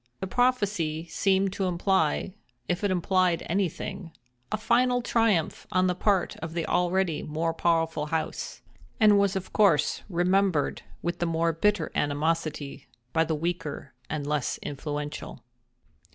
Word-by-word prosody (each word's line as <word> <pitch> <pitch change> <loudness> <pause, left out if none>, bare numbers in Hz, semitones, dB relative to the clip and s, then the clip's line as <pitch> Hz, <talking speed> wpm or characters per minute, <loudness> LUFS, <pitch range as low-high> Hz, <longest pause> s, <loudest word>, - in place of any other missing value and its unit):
The 190 - -3
prophecy 200 -9 +1
seemed 195 -1 +1
to 195 - -1
imply—if 175 -4 -1
it 205 - +2
implied 185 -1 +1
anything—a 165 - -4
final 245 +3 +2
triumph 225 -9 +1
on 185 0 +3
the 180 - +2
part 190 0 +1
of 160 0 -6
the 165 -1 -1
already 180 -2 +1
more 160 +2 -2
powerful 165 -2 +1
house; 160 +1 -3 0.4
and 210 -3 +6
was 200 -1 +2
of 190 -1 -4
course 170 -9 +3
remembered 180 -2 +1 0.2
with 175 0 -2
the 175 - 0
more 165 0 +1
bitter 190 0 +1
animosity 150 0 -1 0.3
by 160 - +4
the 160 0 -1
weaker 165 -4 -4 0.2
and 150 -2 -3
less 145 -3 -1
influential. 145 +1 -5
170 Hz, 130 wpm, -27 LUFS, 155-195 Hz, 0.4 s, and